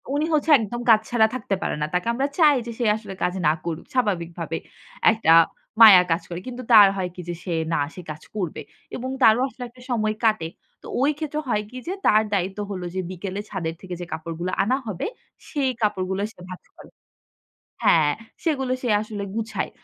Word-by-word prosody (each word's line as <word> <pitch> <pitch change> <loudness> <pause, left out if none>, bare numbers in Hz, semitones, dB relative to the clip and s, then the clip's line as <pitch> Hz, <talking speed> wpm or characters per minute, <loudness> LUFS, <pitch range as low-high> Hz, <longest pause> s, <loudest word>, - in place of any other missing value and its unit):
উনি 300 - +1
হচ্ছে 305 +1 +1
একদম 235 +2 -4
কাজ 220 -1 +8
ছাড়া 225 -3 +4
থাকতে 215 -6 -2
পারে - - -1
না। - - +2
তাকে 180 +6 0
আমরা 270 +4 0
চাই 305 -4 +6
যে, - - -4
সে 240 - 0
আসলে 205 -3 -8
কাজ 180 - +1
না - - +6
করুক। 165 -2 -4
স্বাভাবিকভাবে, 170 -8 -1 0.5
একটা 220 -7 +2 0.5
মায়া 205 -5 +11
কাজ 165 - +2
করে। 170 - -5
কিন্তু 250 0 -6
তার 210 -3 +10
হয় 180 -1 -2
কি? - - -12
যে, - - -1
সে 180 - -3 0.2
না - - +1 0.2
সে 180 - -7
কাজ 150 - -10
করবে 185 -7 -3 0.3
এবং 255 +1 -4
তারও 225 +1 +6
আসলে 260 -1 -9
একটা 250 +1 -18
সময় 215 -2 0
কাটে। 215 -7 +2 0.3
তো - - -10
ওই 285 +3 +4
ক্ষেত্রে 305 -1 -3
হয় 210 -2 +1
কি? 255 - -10
যে, 370 - -1
তার 215 0 +5
দায়িত্ব 195 +1 -1
হলো 185 -2 -4
যে, - - -1
বিকেলে 190 +2 -5
ছাদের 170 -5 -4
থেকে 185 -2 -6
যে, - - -4
কাপড়গুলো 165 +3 -4
আনা 255 +6 +1
হবে, 195 -5 -3 0.4
সেই 275 -3 0
কাপড়গুলো 190 -2 0
সে - - -24
ভাজ 185 - -9
করে - - -14 1.0
হ্যাঁ, 155 -3 +5 0.3
সেগুলো 270 -6 0
সে 250 - -2
আসলে 215 -2 -6
গুছায়। 220 -2 -3
210 Hz, 195 wpm, -23 LUFS, 180-245 Hz, 1.0 s, মায়া